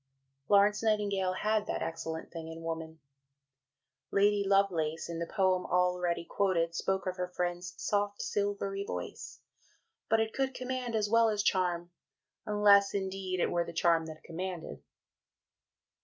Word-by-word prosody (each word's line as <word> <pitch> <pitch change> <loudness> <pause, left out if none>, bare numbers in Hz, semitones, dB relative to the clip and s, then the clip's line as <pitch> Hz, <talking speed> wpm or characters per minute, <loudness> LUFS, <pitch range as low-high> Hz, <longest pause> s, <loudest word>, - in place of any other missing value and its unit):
'" 135 +1 -49
Florence 205 +1 +4
Nightingale 200 -4 +1
had 215 +2 0
that - - -2
"excellent 160 0 -5
thing 165 -1 -7
in 165 0 -8
woman": 160 -1 -5 1.1
Lady 205 0 +3
Lovelace, 180 -6 +1
in 170 -1 -5
the 170 - -3
poem 185 -1 +2
already 180 -1 +1
quoted, 170 -4 +1
spoke 190 +3 -1
of 185 0 -3
her 180 0 -2
friend's 175 0 -3
"soft, 205 0 -1
silvery 200 -1 -2
voice"; - - -6 0.7
but 225 0 +4
it 220 0 0
could 265 -1 -1
command, 255 -2 -3
as 210 -1 +1
well 230 +1 +4
as 210 -1 0
charm, 175 -3 0 0.6
unless 205 -1 +5
indeed 190 -1 -2
it - - +1
were 175 0 +1
the 170 - -8
charm 165 -1 +2
that 155 -1 -10
commanded. 180 0 -6
185 Hz, 145 wpm, -31 LUFS, 170-205 Hz, 1.1 s, unless